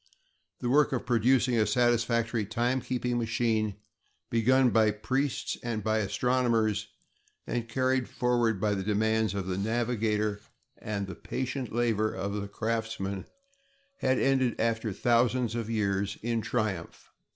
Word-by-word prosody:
The 120 - -1
work 145 0 +4
of 125 - -2
producing 125 0 +3
a 105 - +3
satisfactory 115 0 +2
timekeeping 120 +2 -1
machine, 110 -2 0 0.6
begun 125 +2 +4
by 110 -1 +4
priests 130 +6 -1
and 115 -3 -3
by 110 +1 +1
astronomers, 115 0 +1 0.6
and 115 -1 -3
carried 130 +1 +1
forward 120 -4 +1
by 105 +1 +1
the 95 - -2
demands 110 0 +1
of 100 -2 -2
the 95 0 -2
navigator 110 -2 0 0.4
and 100 -2 -3
the 95 - -7
patient 130 -1 -4
labor 110 -2 +1
of 100 +1 -3
the 100 -1 -3
craftsman, 110 -3 -3 0.7
had 130 -1 +2
ended 130 -3 +2
after 115 -1 0
thousands 120 +2 +2
of 115 -2 -3
years, 100 -3 0
in 115 -1 0
triumph. 105 -8 -3
115 Hz, 130 wpm, -29 LUFS, 105-125 Hz, 0.7 s, work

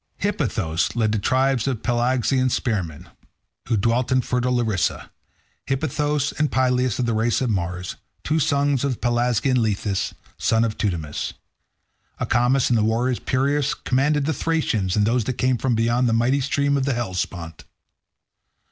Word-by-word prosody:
Hippothous 110 - -1
led 110 -3 +1
the 110 - 0
tribes 130 +2 +1
of 125 -5 -2
Pelasgian 130 +1 +1
spearsmen, 95 - -2 0.6
who 115 -2 +1
dwelt 115 +5 +1
in 130 0 +4
fertile 125 0 0
Larissa—Hippothous, 135 - -2
and 150 -1 +1
Pylaeus 125 -2 +1
of 125 - 0
the 115 - 0
race 110 +2 +1
of 125 -3 0
Mars, 90 -2 -3 0.3
two 155 +2 +1
sons 140 -2 +1
of 140 -2 +1
the - - -8
Pelasgian 120 +1 +1
Lethus, 105 -3 -1 0.2
son 115 0 +2
of 110 -2 -1
Teutamus. 85 -8 -3 0.9
Acamas 125 +3 +2
and 120 -2 +3
the - - +2
warrior 120 +3 +1
Peirous 140 +2 0
commanded 140 +3 +1
the 160 - 0
Thracians 125 - 0
and 105 -1 +3
those 115 0 +1
that 130 - -1
came 125 0 0
from 130 -3 +1
beyond 120 +2 +2
the - - +1
mighty 125 +5 +2
stream 140 +1 +1
of 135 - 0
the 135 -3 0
Hellespont. 90 -7 -4
120 Hz, 155 wpm, -23 LUFS, 110-135 Hz, 0.9 s, in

